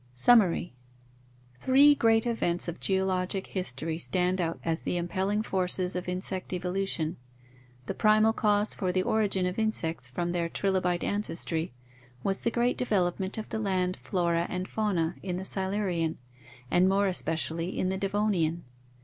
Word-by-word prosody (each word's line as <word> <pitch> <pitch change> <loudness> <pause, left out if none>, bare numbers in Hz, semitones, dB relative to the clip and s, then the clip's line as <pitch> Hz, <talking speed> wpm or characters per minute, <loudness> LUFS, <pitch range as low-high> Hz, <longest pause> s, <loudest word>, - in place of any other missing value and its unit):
Summary. 185 - +3 0.4
— 125 0 -31
Three 280 +3 +6
great 225 -4 +2
events 180 -8 +1
of 170 - -5
geologic 190 0 0
history 160 -2 -3
stand 180 +1 +1
out 165 -1 -2
as 165 0 +2
the 180 - -2
impelling 190 +4 -1
forces 185 -2 +3
of 180 0 -3
insect 185 0 -2
evolution. 180 -3 -2 0.7
The - - -3
primal 215 +1 +3
cause 210 -1 +1
for 185 -2 -2
the 185 0 0
origin 200 -4 +1
of 180 +3 -2
insects 165 - 0
from 175 +7 -3
their 170 -1 -1
trilobite 185 -2 0
ancestry 170 -6 -2 0.5
was 195 -1 +1
the - - +1
great 240 +2 0
development 190 -4 0
of 220 - -6
the 220 - -3
land 185 -3 0
flora 170 -2 -1
and 180 +1 -3
fauna 185 -6 -1
in 180 -2 -3
the 190 - -5
Silurian 190 -4 -1 0.5
and 180 +1 +4
more 200 +1 +2
especially 165 -1 0
in 185 - 0
the 190 - -2
Devonian. 195 -5 0
185 Hz, 150 wpm, -28 LUFS, 170-205 Hz, 0.7 s, Three